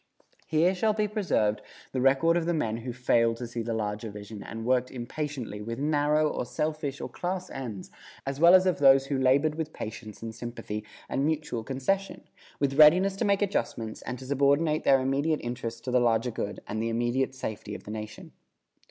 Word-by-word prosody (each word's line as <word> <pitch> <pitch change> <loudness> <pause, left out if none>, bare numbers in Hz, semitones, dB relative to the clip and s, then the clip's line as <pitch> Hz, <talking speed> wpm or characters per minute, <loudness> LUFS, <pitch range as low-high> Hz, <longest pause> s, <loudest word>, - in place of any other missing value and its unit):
Here 160 +4 +3
shall 215 +3 +1
be 210 0 0
preserved 180 - 0 0.3
the 130 - -1
record 135 +6 +4
of 170 -1 0
the 175 - +1
men 115 -7 -1
who 120 +2 -5
failed 115 -2 +2
to 120 - -5
see 120 0 -4
the 115 0 -2
larger 105 0 -3
vision 105 0 -9
and 115 +2 -7
worked 125 0 +2
impatiently 125 -3 -5
with 115 +2 -5
narrow 150 +1 +2
or 150 - -2
selfish 150 0 -3
or - - -4
class 185 +1 -4
ends, 115 -8 -6 0.3
as 135 +1 -3
well 170 +3 +8
as 185 0 +5
of 180 -6 +1
those 135 -1 +6
who 135 0 -1
labored 140 +4 +3
with 155 0 -4
patience 110 0 -7
and 115 -1 -5
sympathy 110 -3 -6 0.2
and 135 - -1
mutual 150 -6 -1
concession, 140 - -2 0.4
with 140 +1 0
readiness 180 +6 +7
to - - 0
make 200 0 +3
adjustments 115 - -2
and 125 - -5
to 130 - -10
subordinate 140 +3 +2
their 135 -1 +6
immediate 140 +4 +1
interests 115 -1 -4
to 125 - -4
the 125 - +4
larger 120 0 +2
good 105 -2 -4
and 110 +1 -3
the 115 - -1
immediate 120 +3 0
safety 105 -4 -5
of - - -9
the 105 - -8
nation. 110 0 -7
135 Hz, 195 wpm, -28 LUFS, 115-155 Hz, 0.4 s, well